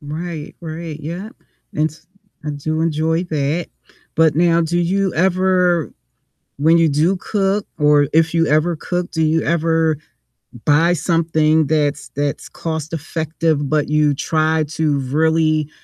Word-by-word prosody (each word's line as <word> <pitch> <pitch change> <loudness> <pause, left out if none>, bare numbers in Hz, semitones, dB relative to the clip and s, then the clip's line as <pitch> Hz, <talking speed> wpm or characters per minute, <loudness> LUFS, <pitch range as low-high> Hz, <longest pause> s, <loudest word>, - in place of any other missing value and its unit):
Right, 155 +1 -6
right, 160 -1 -6
yep, 175 - -6 0.4
and 155 +1 +1
s 160 +2 -19 0.4
I 150 - -2
do 155 +2 -3
enjoy 160 +1 0
that. 155 0 -1 0.5
But 160 -2 +3
now, 170 0 +3
do 170 +1 0
you 190 +2 0
ever 180 -1 +2 0.7
when 160 +4 +4
you 165 -1 +4
do 160 +7 +2
cook 195 +1 -1
or 150 -1 +4
if 160 +1 +2
you 165 -1 +3
ever 155 +3 +2
cook, 175 +3 -3
do 160 - 0
you 160 0 +2
ever 160 -1 +1 0.7
buy 165 +4 +4
something 160 -1 +2
that's 150 -3 0
that's 145 -1 -2
cost-effective 160 -1 -3
but 155 -1 +1
you 150 -1 +2
try 155 +2 +1
to 155 -2 0
really 155 +2 +1
160 Hz, 135 wpm, -19 LUFS, 150-170 Hz, 0.7 s, when